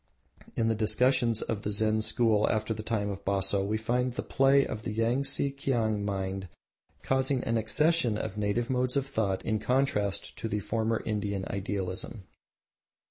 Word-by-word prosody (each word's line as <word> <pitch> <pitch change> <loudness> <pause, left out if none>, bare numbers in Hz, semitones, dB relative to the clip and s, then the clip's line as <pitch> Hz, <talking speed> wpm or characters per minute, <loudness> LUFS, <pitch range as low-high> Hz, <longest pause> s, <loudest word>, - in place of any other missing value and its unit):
In 115 - +1
the 115 - +3
discussions 115 +2 +2
of 110 -3 -3
the 105 - -3
Zen 110 +1 +1
school 110 -1 +2
after 110 +1 0
the 110 - -6
time 105 -2 -1
of 100 0 -7
Baso 100 0 +1
we 105 +2 0
find 125 +3 0
the - - -2
play 135 +1 +4
of 110 - -5
the 110 - -4
Yangtse 125 +5 0
Kiang 115 -7 0
mind 95 -2 -3 0.5
causing 130 0 +1
an 115 - 0
accession 115 +3 +2
of 110 -2 -4
native 105 +3 0
modes 125 0 0
of 135 - +1
thought 105 -7 -1
in 110 -1 0
contrast 110 -5 0
to - - -3
the 105 -1 -1
former 110 +2 -1
Indian 100 -3 -2
idealism. 100 +1 -4
110 Hz, 165 wpm, -29 LUFS, 100-125 Hz, 0.5 s, play